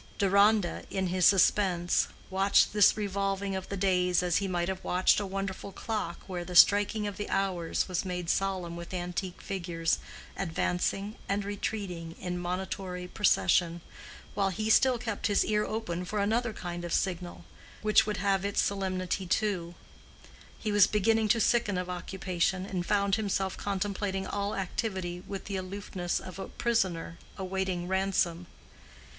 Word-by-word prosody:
Deronda, 200 -1 +3
in 190 -1 -1
his 180 -1 +4
suspense, 185 -2 +3 0.2
watched 195 +2 +4
this 210 0 +5
revolving 195 -1 -1
of 190 0 -5
the 200 - -3
days 180 -2 +2
as 175 -2 +2
he 200 - -1
might 175 -2 -1
have 190 -1 -4
watched 180 +3 +3
a 205 - -3
wonderful 195 0 -4
clock 205 -5 -4
where 180 -2 -4
the 180 +1 -7
striking 205 +3 +6
of 205 -2 -4
the 205 - -4
hours 185 -4 0
was 180 -2 -1
made 180 -2 -4
solemn 185 -2 -1
with 170 +2 -7
antique 180 +1 -4
figures 170 -4 -1 0.4
advancing 195 +3 -1
and 200 0 0
retreating 195 -5 -4
in 180 -1 -3
monitory 180 0 -4
procession, 175 -3 +2 0.5
while 195 -1 +1
he 215 +3 -1
still 255 +2 +5
kept 225 -3 -2
his 205 -2 +2
ear 210 0 +1
open 200 -6 -3
for 195 +4 -4
another 225 +4 +1
kind 175 -4 -6
of 175 - -5
signal 180 -1 -2 0.4
which 215 0 +4
would 210 - -1
have 195 0 +1
its 200 0 -1
solemnity 190 -1 -1
too: 175 -3 -1 0.8
He 215 - -3
was 205 -2 +6
beginning 220 +1 +2
to 230 +2 +3
sicken 225 -4 +2
of 180 0 -3
occupation, 185 0 -1
and 185 -3 -3
found 200 +1 +2
himself 195 -3 -1
contemplating 195 -1 -2
all 200 0 -2
activity 190 -2 -3
with 195 -1 -6
the 195 -1 -3
aloofness 185 -1 -3
of 185 0 -9
a 190 - -5
prisoner 185 -8 -1 0.2
awaiting 190 -2 -2
ransom. 185 -2 0
190 Hz, 155 wpm, -29 LUFS, 180-205 Hz, 0.8 s, striking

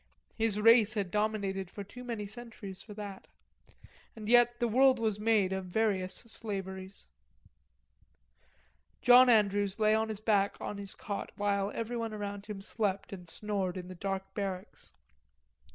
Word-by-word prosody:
His 220 -2 +1
race 225 0 +6
had 195 -4 -2
dominated 200 -3 -1
for 200 - -7
too 250 +6 -11
many 230 -4 -4
centuries 215 -3 -8
for 210 - -10
that. 205 -2 -8 0.9
And 215 -2 -8
yet 240 0 +5
the 240 - +2
world 260 +2 +4
was 215 -3 0
made 210 -3 +2
of 190 -1 -3
various 190 -1 0
slaveries. 195 -4 -5 2.0
John 250 +1 +8
Andrews 205 -3 +3
lay 215 -1 +4
on 220 0 +1
his 215 -2 -4
back 205 -2 +1
on 205 - -5
his 200 -1 -8
cot 200 -1 -5
while 200 -1 0
everyone 230 -1 -3
about 205 -1 -5
him 205 -2 -6
slept 200 -1 -2
and 180 -3 -9
snored 195 -2 -2
in 180 0 -7
the - - -6
dark 195 +1 -4
barracks. 190 -2 -5
205 Hz, 150 wpm, -31 LUFS, 195-225 Hz, 2.0 s, John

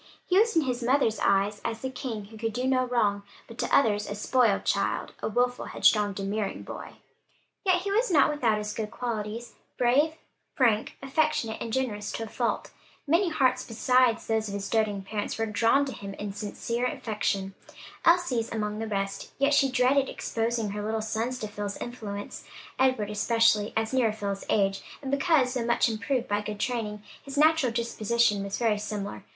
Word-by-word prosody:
He 370 +1 +4
was 450 -2 +3
in 325 - +4
his 250 -2 -2
mother's 240 -3 +2
eyes 200 +1 +2
as 225 -1 -3
the 260 - -2
king, 235 -5 -5
who 220 +2 -13
could 225 -1 -2
do 250 +3 -2
no 260 -1 +2
wrong, 210 -5 +1 0.3
but 230 - -12
to - - -1
others 210 -5 +2
a 205 - -3
spoiled 220 0 +2
child, - - 0
a - - -1
wilful, 245 +3 0
headstrong, 210 -2 +3
domineering 200 +1 -3
boy. - - -8 0.7
Yet 365 -3 +3
he 400 - -2
was 455 +4 +2
not 300 -4 +5
without 240 -8 +1
his 210 0 -4
good 215 -2 -3
qualities, 230 -1 -4 0.2
brave, 285 +6 +3 0.4
frank, 230 -5 +2
affectionate, 270 -5 0
and 230 - -4
generous 220 -5 -2
to 225 - -3
a - - -6
fault, 235 +2 -2 0.3
many 340 +5 +3
hearts 255 -5 +2
besides 245 0 +2
those 220 -1 0
of 200 - -4
his 200 0 -4
doting 210 -3 +1
parents 205 +1 -3
were 225 - 0
drawn 230 +6 +3
to 270 - -5
him 200 -1 -7
in 205 -1 -5
sincere 230 +4 -2
affection; 200 -5 -2 0.5
Elsie's 330 -10 +3
among 210 -1 -2
the 225 - -3
rest; 195 -1 -3
yet 280 +1 +3
she 275 -1 +4
dreaded 260 +2 +3
exposing 225 -2 -2
her 205 +1 -4
little 220 +1 -2
sons 225 +3 -2
to 215 - -4
Phil's 205 -1 -5
influence; 205 -4 -6 0.4
Edward 255 -6 +2
especially 220 -1 +3
as 225 +2 -1
nearer 245 -4 +3
Phil's 200 -2 -4
age, 195 -2 +2 0.2
and 270 -2 -5
because, 280 -3 +3
though 250 -3 -1
much 235 +1 +2
improved 235 +3 -1
by 205 0 0
good 210 0 -6
training, 210 -4 -2 0.2
his 275 +1 -8
natural 310 -4 +4
disposition 230 -2 +1
was 200 0 -3
very 220 -3 +1
similar. 205 - -5
225 Hz, 185 wpm, -27 LUFS, 210-255 Hz, 0.7 s, not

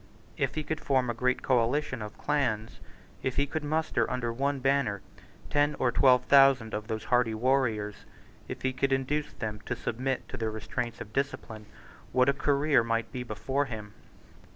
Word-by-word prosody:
If - - -1
he 155 - -2
could 155 +1 -3
form 130 -3 +1
a - - -3
great 125 +2 0
coalition 130 +1 +1
of 105 0 -7
clans, 120 -7 -1 0.4
if 130 - -2
he 140 - +2
could 150 +2 -4
muster 155 +2 0
under 125 -2 -2
one 140 +3 0
banner 135 -6 +1 0.5
ten 145 0 +2
or 125 - +2
twelve 125 0 +5
thousand 135 -5 +5
of 105 0 -3
those 110 -1 -3
hardy 120 -3 +2
warriors, 110 -4 +1 0.5
if - - -7
he 130 0 +1
could 135 +1 0
induce 145 +3 -1
them 105 -2 -4
to - - -1
submit 130 +3 -2
to - - -6
the 110 -1 -1
restraints 110 +2 -4
of 105 -1 -9
discipline, 110 -5 -3 0.5
what 125 +1 +4
a - - +4
career 140 -1 +2
might 115 0 -1
be 125 - -4
before 130 +5 -1
him! 105 -5 -7
125 Hz, 175 wpm, -29 LUFS, 115-140 Hz, 0.5 s, twelve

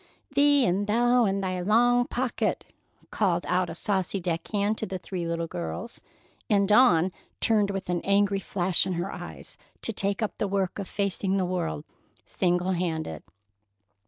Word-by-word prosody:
"Thee 285 -1 +5
and 195 +2 0
thou 240 +2 +3
and 195 -1 0
thy 185 -1 -2
long 245 +5 +3
pocket!" 250 0 -1 0.5
called 180 -5 +1
out 180 -1 +1
a 165 - -6
saucy 195 +1 -1
deck 170 -2 -3
hand 210 +1 0
to 220 - -3
the 190 - -4
three 180 -1 -5
little 170 0 -1
girls, 85 - -6 0.5
and 200 -2 +3
Dawn 190 -6 +5 0.3
turned 210 -3 +2
with 195 -1 -4
an 175 -1 -1
angry 200 0 +2
flash 185 -1 0
in 185 - -1
her 175 +2 -3
eyes - - -9 0.2
to 225 - -1
take 200 +1 -1
up 215 - -4
the 210 - 0
work 195 0 -1
of 195 - -4
facing 195 -1 -1
the 185 - +1
world 175 - -3 0.4
single 180 0 0
handed. 160 - -2
195 Hz, 165 wpm, -27 LUFS, 175-210 Hz, 0.5 s, Thee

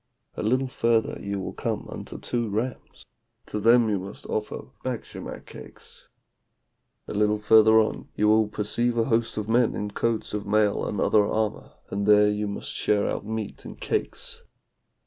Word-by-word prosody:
A - - -4
little 130 +5 +1
further 115 -3 +1
you 100 0 -3
will 95 - -5
come - - -3
unto - - -8
two 120 -2 -2
rams, 115 +4 -4 0.4
to 105 - -4
them 115 +2 +5
you 105 -3 0
must 95 +2 -9
offer 105 0 -4
batschimak - - -6
cakes. - - -14 1.0
A - - -5
little 105 +1 +2
further 110 +1 +6
on 110 - -1
you 105 - +2
will 110 0 +4
perceive 120 +3 -1
a 115 - +3
host 115 -1 0
of 105 -1 -2
men 120 +1 +3
in 105 0 -3
coats 115 +1 -1
of 105 -1 -3
mail 105 0 +2
and 105 - -3
other 105 +1 +4
armour, 110 +1 -2 0.2
and 100 +1 -2
there 105 0 +6
you 105 0 -2
must 100 - -5
share 105 -1 +1
out - - -3
meat 110 -1 -5
and - - -10
cakes. - - -3
105 Hz, 170 wpm, -26 LUFS, 105-115 Hz, 1.0 s, further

